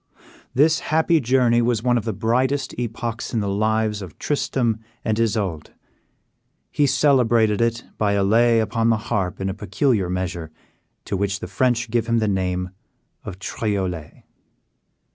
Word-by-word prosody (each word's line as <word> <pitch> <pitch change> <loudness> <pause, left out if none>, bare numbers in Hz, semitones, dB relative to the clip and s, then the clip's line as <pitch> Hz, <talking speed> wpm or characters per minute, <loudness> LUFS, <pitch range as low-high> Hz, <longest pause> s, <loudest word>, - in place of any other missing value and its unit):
This 155 +5 +4
happy 160 +1 +2
journey 120 -2 +3
was 115 -2 0
one 125 -1 +3
of 115 - -1
the 110 - -1
brightest 130 +6 0
epochs 120 0 -4
in - - +2
the 100 - -2
lives 110 +1 0
of 90 -5 -9
Tristram 120 -6 -1 0.3
and 110 - +1
Isoude. 100 -8 -1 1.0
He 145 - +2
celebrated 120 -6 +3
it 115 0 0 0.2
by 105 -2 +2
a 100 -1 +2
lay 115 +3 +4
upon 115 +1 +1
the 115 - +3
harp 95 -4 -2
in 95 - -2
a 95 - -2
peculiar 105 - 0
measure, 90 -3 -3 0.6
to - - -2
which 100 0 -1
the - - -6
French 120 +4 0
give 115 -1 0
the 110 - 0
name 90 -2 -1 0.5
of 95 - -7
Triolet. 95 -6 -3
110 Hz, 150 wpm, -22 LUFS, 100-120 Hz, 1.0 s, This